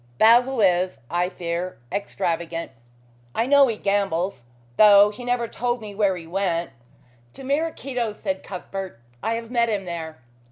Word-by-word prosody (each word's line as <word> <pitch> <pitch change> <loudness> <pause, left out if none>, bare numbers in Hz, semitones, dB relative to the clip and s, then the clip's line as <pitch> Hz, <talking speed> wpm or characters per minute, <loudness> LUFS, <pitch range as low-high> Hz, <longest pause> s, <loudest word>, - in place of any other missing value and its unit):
Basil 240 - +5
is, 180 - +2
I 175 +1 +1
fear, 175 +1 -4
extravagant. 170 -4 -3 0.6
I 230 - +1
know 280 +1 +6
he 225 -3 -2
gambles, 195 -8 -1 0.3
though 205 -1 +7
he 215 +4 -10
never 245 -1 0
told 245 +1 -2
me 210 -2 -8
where 200 -2 +1
he 165 - -9
went 170 -3 -1 0.3
" 120 -1 -32
"To - - -10
Maraquito's," 265 -6 -2
said 190 -2 -2
Cuthbert. 190 -5 -7 0.2
"I 225 - 0
have 230 0 -6
met 235 -2 +2
him 200 -3 -2
there." 165 -2 -6
200 Hz, 155 wpm, -23 LUFS, 175-230 Hz, 0.6 s, though